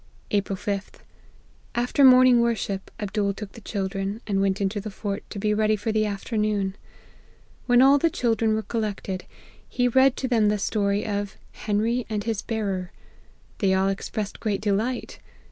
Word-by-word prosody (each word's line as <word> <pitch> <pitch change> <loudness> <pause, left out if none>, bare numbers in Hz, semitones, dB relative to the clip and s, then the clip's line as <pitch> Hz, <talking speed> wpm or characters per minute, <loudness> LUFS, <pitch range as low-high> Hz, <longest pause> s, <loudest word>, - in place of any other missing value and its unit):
*' - - -32
April 200 -1 0
5th. 200 0 -4 0.7
After 245 +4 +2
morning 255 -2 +7
worship 205 -4 -1
Abdool 205 -1 -1
took 205 -1 -7
the 230 - -13
children, 195 0 -3
and 195 -2 0
went 195 -1 +1
into 200 +1 -1
the 215 - -6
fort, 200 0 -4
to - - -7
be 210 +1 +1
ready 215 0 +2
for 210 +2 -2
the 215 0 +1
afternoon. 205 -1 -1 0.9
When 245 0 +6
all 275 +2 +6
the 330 - +3
children 225 -5 +1
were 220 - -2
collected, 205 -5 -3 0.4
he 245 -1 +1
read 260 +1 +4
to 260 - -2
them 225 -4 +3
the 210 - +1
story 200 0 0
of 205 -2 -3
' - - -28
Hen 205 -1 -2
ry 240 +2 0
and 210 -2 -2
his 225 -2 -2
Bearer.' 195 -5 -3 0.7
They 190 -3 +3
all 190 +1 +2
expressed 200 +1 -4
great 210 -3 -1
delight. 220 +4 -1
210 Hz, 175 wpm, -25 LUFS, 200-230 Hz, 0.9 s, morning